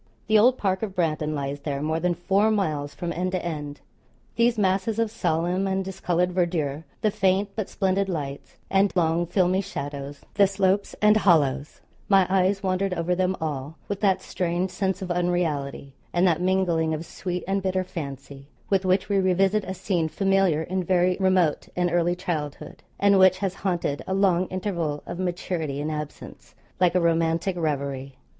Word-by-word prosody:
The 215 0 +4
old 250 +4 +5
park 190 -2 0
of 205 -4 -4
Brandon 155 -3 0
lies 140 0 -3
there, 140 -1 -3
more 160 +2 -1
than 180 0 0
four 195 +5 +2
miles 155 -9 -1
from 175 -1 -4
end 185 +2 -2
to 185 - -2
end. 150 -3 -5 0.5
These 235 0 +3
masses 195 +2 +1
of 230 -2 0
solemn 180 -1 0
and 190 0 -1
discoloured 180 -2 0
verdure, 165 -4 -1 0.2
the 215 - +2
faint 195 0 +1
but 215 -3 -3
splendid 195 0 0
lights, 140 -5 -5
and 195 +1 +3
long 170 0 +2
filmy 185 +1 +2
shadows, 145 -6 -6
the 200 -2 +5
slopes 195 0 0
and 210 0 +6
hollows 150 -8 +2 0.3
my 195 -2 +5
eyes 195 +1 +2
wandered 190 0 0
over 170 +1 0
them 185 +1 0
all 150 -1 -4
with 200 -1 -3
that 195 -3 +2
strange 180 +1 -2
sense 190 0 -2
of 180 - -4
unreality, 165 -6 -1 0.2
and 175 +1 +3
that 170 -2 +2
mingling 175 -4 +1
of 160 +2 -6
sweet 180 +1 -4
and 195 0 0
bitter 185 0 0
fancy, 140 -5 -8 0.2
with 195 -1 +3
which 185 +1 +2
we 200 -1 +2
revisit 190 +2 +2
a 190 +1 -5
scene 180 -3 0
familiar 195 -2 +2
in 185 +2 -2
very 180 0 +2
remote 185 -5 +2
and 180 -1 +1
early 175 +1 +2
childhood, 160 -6 -5 0.2
and 200 -1 +5
which 185 0 +6
has 190 -1 -2
haunted 175 -7 -1
a 190 - -1
long 185 -2 +2
interval 170 -6 -3
of 175 - -6
maturity 175 -5 -2
and 150 +2 -2
absence, 150 -1 -8 0.2
like 180 -1 +3
a - - +5
romantic 165 +2 +1
reverie. 140 -4 -3
180 Hz, 175 wpm, -25 LUFS, 160-190 Hz, 0.5 s, and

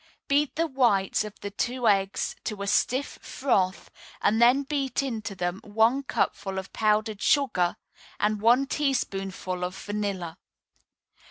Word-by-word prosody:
Beat 290 0 +2
the 330 +2 +1
whites 240 - +2
of 210 -1 -9
the 205 - -5
two 245 +4 -1
eggs 195 -1 +1
to 210 -3 -3
a - - -3
stiff 255 +7 0
froth, 195 -9 -1 0.3
and 220 +2 +2
then 250 +4 +5
beat 275 -1 -1
into 225 -6 -4
them 175 0 -3
one 225 +6 +2
cupful 195 -7 -2
of 190 0 -6
powdered 215 -1 +1
sugar 185 -12 +2 0.4
and 210 0 0
one 240 +5 +5
teaspoonful 195 -10 -2
of 180 +1 -3
vanilla. 200 -5 -4
215 Hz, 140 wpm, -26 LUFS, 195-260 Hz, 0.4 s, then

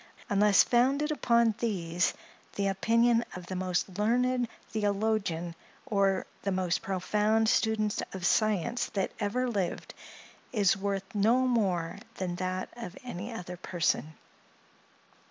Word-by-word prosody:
Unless 200 0 +5
founded 275 +5 +2
upon 235 -6 +3
these, 180 -6 0 0.4
the 200 - 0
opinion 230 +4 +3
of 180 -1 -7
the 185 - -5
most 185 +1 -2
learned 245 +3 +2 0.2
theologian 200 -5 0 0.3
or 195 -2 +1 0.2
the 195 - -1
most 185 -2 0
profound 210 +4 +1
student 215 -1 +1
of 185 -2 -5
science 215 +3 +1
that 195 - 0
ever 235 +5 0
lived, 200 -7 -2 0.6
is 200 -6 +3
worth 195 0 -2
no 220 +5 +3
more 190 -9 0 0.2
than 180 -2 -3
that 185 0 -3
of 230 -6 -8
any 225 -2 -6
other 180 -5 -6
person. 165 -3 -1
205 Hz, 120 wpm, -29 LUFS, 185-230 Hz, 0.6 s, Unless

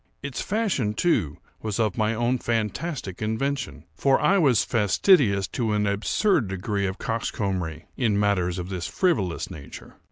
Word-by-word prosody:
Its 140 -2 -4
fashion, 190 - 0
too, 105 - +1 0.2
was 110 -1 -3
of 110 -4 +1
my 110 -1 +1
own 120 +2 +1
fantastic 115 - -3
invention; 135 +6 -2
for 135 -1 +2
I 200 0 +3
was 135 - +4
fastidious 105 - +3
to 115 -3 -1
an 105 0 +1
absurd 110 - +1
degree 100 +1 -2
of 95 +1 -4
coxcombry, 95 -7 -3
in 110 -5 +1
matters 95 -4 +1
of 90 0 -5
this 90 -3 -3
frivolous 110 - 0
nature. 70 -3 -11
110 Hz, 150 wpm, -25 LUFS, 95-130 Hz, 0.2 s, was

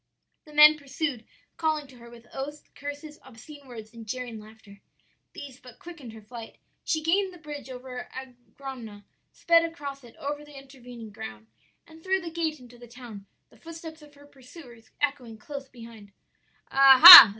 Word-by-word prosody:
"The 300 - -16
men 300 +1 +7
pursued, 275 -3 -4 0.3
calling 310 -2 -1
to 265 -2 -17
her 235 0 -14
with 235 0 -16
oaths, 290 +3 -7
curses, 290 +1 -9
obscene 270 +3 -15
words, 225 -2 -11
and 230 -1 -12
jeering 245 -1 -6
laughter. 210 -2 -16 0.5
"These 270 -2 -10
but 250 -4 -15
quickened 305 -10 -11
her 220 -1 -13
flight; 230 +1 -11 0.3
she 315 -2 -1
gained 380 +4 +1
the 360 - -14
bridge 295 -4 -9
over 250 0 -9
the - - -11 0.4
Angrogna, 230 -7 -9 0.3
sped 335 0 +3
across 285 -5 -7
it, 235 - -16
over 290 +1 -5
the 295 -1 -14
intervening 250 -5 -12
ground, 110 - -10 0.4
and 320 0 -17
through 380 0 0
the 335 -1 -7
gate 320 -2 -3
into 245 -1 -16
the 240 - -13
town; 230 -5 -12 0.2
the - - -21
footsteps 325 -1 -11
of 295 -1 -17
her 285 0 -18
pursuers 250 -4 -16
echoing 275 -6 -3
close 275 +4 -9
behind. 230 -5 -14 0.6
"'Ah 270 -1 +7
ha! 345 - +15
270 Hz, 170 wpm, -26 LUFS, 235-300 Hz, 0.6 s, ha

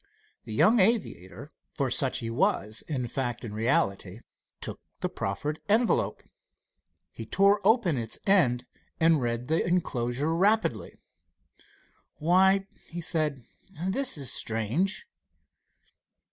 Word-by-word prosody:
The 110 - -7
young 225 - +5
aviator 155 - 0 0.2
for 135 -3 -2
such 135 -2 +2
he 115 - -3
was 110 -2 0
in 130 -5 -2
fact 120 0 -3
and 105 - -7
reality 105 -3 -1 0.4
took - - -7 0.2
the - - -1
proffered 145 +11 -4
envelope. 225 +3 +1 0.9
He - - -9
tore 200 +1 +3
open 205 - +3
its 115 -1 -3
end 145 -12 +3 0.3
and 160 -3 +4
read 120 0 -2
the 160 +2 +1
enclosure 145 -4 -1
rapidly. 210 +5 +1 1.2
"Why," 190 +4 +3 0.2
he 170 - -6
said, 155 -6 -1 0.3
"this 190 - +2
is 135 -4 -2
strange." 115 - -1
150 Hz, 115 wpm, -27 LUFS, 120-190 Hz, 1.2 s, young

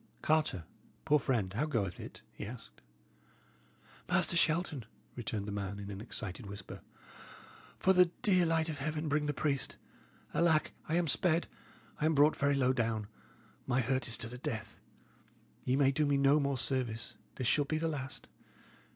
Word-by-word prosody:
"Carter, 155 - +2 0.4
poor 150 +1 +4
friend, 115 -7 0
how 135 +9 0
goeth 100 - -1
it?" - - -9
he - - -7
asked. 115 +3 -9 1.3
"Master - - +2
Shelton," 160 -6 +2 0.3
returned 110 -4 -3
the 105 - -4
man, 100 -1 -3
in 100 0 -6
an 100 0 -6
excited 100 -4 -5
whisper, 100 -1 -8 1.0
"for 190 - +4
the 180 -1 +7 0.2
dear 185 -4 +4
light 160 -1 +2
of 155 -4 -4
heaven, 155 +3 -2
bring 150 0 +1
the - - +2
priest. 140 -1 -1 0.6
Alack, 165 -2 +3 0.2
I 160 - +1
am 175 -1 +2
sped; 170 +2 +3 0.5
I 150 - +1
am 160 0 +3
brought 145 +2 +5
very 140 0 +2
low 130 -1 +3
down; 110 -4 -1 0.6
my 125 - +2
hurt 130 +2 0
is 120 - 0
to 115 - -5
the 125 +2 -8
death. 115 -3 -4 0.9
Ye 125 - +2
may 135 -1 +4
do 150 +2 +1
me 140 -1 +3
no 140 +2 +5
more 140 -2 0
service; 120 -3 0 0.2
this 130 - -3
shall 145 +4 +3
be 155 +2 -1
the 165 +1 0
last. 135 -5 -5
135 Hz, 170 wpm, -33 LUFS, 115-155 Hz, 1.3 s, the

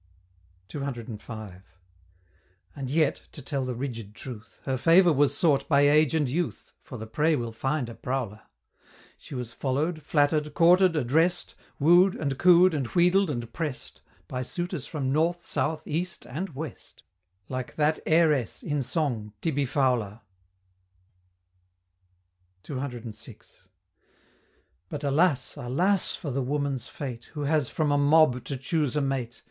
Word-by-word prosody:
CCV. 110 -6 -7 1.1
And 135 -2 -5
yet 155 +2 +1
to - - -9
tell 135 0 -2
the 130 -1 -3
rigid 115 -5 -6
truth 115 -4 -10
Her 130 - -1
favor 170 +5 +5
was 140 0 +2
sought 145 -6 +2
by 140 -2 +5
Age 150 +1 +4
and 150 -3 +2
Youth 165 +7 -3
For 130 - -9
the 110 - -6
prey 150 +8 +1
will 120 -4 -3
find 135 +3 -2
a 115 - -7
prowler! 120 -5 -4 0.8
She 140 - -10
was 125 -2 -5
follow'd, 150 +6 -1
flatter'd, 150 0 +1
courted, 180 +1 +5
address'd, 160 +6 +1 0.3
Woo'd, 175 +6 +5
and 140 -3 -3
coo'd, 180 0 +6
and 140 -5 -1
wheedled, 180 +4 +3
and 120 -4 -4
press'd, 150 -6 -5 0.3
By 125 - -4
suitors 175 +3 -4
from 140 -5 -2
North, 170 +4 +1
South, 155 +1 -2
East, 170 +4 -3
and 155 +4 -5
West, 155 +2 -8 0.4
Like 130 -1 -5
that 155 +1 +2
Heiress, 155 -6 +2
in 145 -2 -1
song, 120 -6 -2
Tibbie 145 -2 0
Fowler! 120 -6 0 2.4
CCVI. 125 -5 -8 1.2
But, 150 - -5
alas! 145 -1 +2
alas! 175 +11 +1
for 145 - -5
the 135 +2 -1
Woman's 140 -1 -2
fate, 125 -5 -7
Who 150 - -5
has 145 -2 +1
from 155 -2 0
a 145 - +3
mob 145 -3 +4
to 140 - -4
choose 145 +1 -1
a 150 - +2
mate! 130 -3 -2
140 Hz, 140 wpm, -27 LUFS, 125-160 Hz, 2.4 s, coo'd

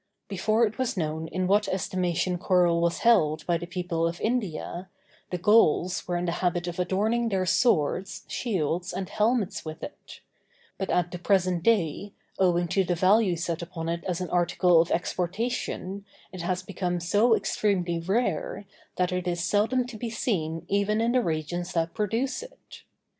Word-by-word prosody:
Before 215 +4 +2
it 220 +3 -5
was 255 -4 -1
known 160 -1 -2
in 185 +2 -2
what 205 +2 +3
estimation 185 -1 -1
coral 175 -2 +3
was 170 0 +1
held 155 -10 +4
by 170 -1 +1
the 175 - -6
people 175 -2 -1
of 170 +1 -4
India, 190 -5 -2 0.4
the 180 - -2
Gauls 185 -2 +3
were 175 -1 0
in 175 - -2
the 170 - 0
habit 175 -1 0
of 175 +1 -5
adorning 215 +6 +1
their 190 -3 0
swords, 190 - +1
shields, 180 - -2
and 190 - -3
helmets 220 -2 0
with 155 0 -8
it; - - -10 0.6
but 190 - -3
at 175 -1 +1
the 180 - -6
present 185 -2 +2
day, 200 -1 +1 0.3
owing 175 -2 +3
to 195 - +2
the 175 -1 0
value 190 +2 +4
set 170 0 -3
upon 165 -1 -5
it 170 0 -3
as 180 -1 -2
an 180 - -4
article 175 -1 +4
of 170 - -2
exportation, 190 +2 -2 0.3
it 185 -1 -7
has 180 +2 -2
become 180 -2 -2
so 205 +7 +3
extremely 180 -7 0
rare, 195 +1 -1 0.3
that 180 -1 0
it 180 0 -2
is 175 -1 -1
seldom 220 +7 +2
to 240 -3 -8
be 235 - -3
seen 170 -8 -2
even 200 +2 +1
in 230 +1 +2
the 250 0 +3
regions 175 0 -3
that 165 -1 0
produce 225 - -1
it. - - -13
180 Hz, 175 wpm, -27 LUFS, 170-210 Hz, 0.6 s, held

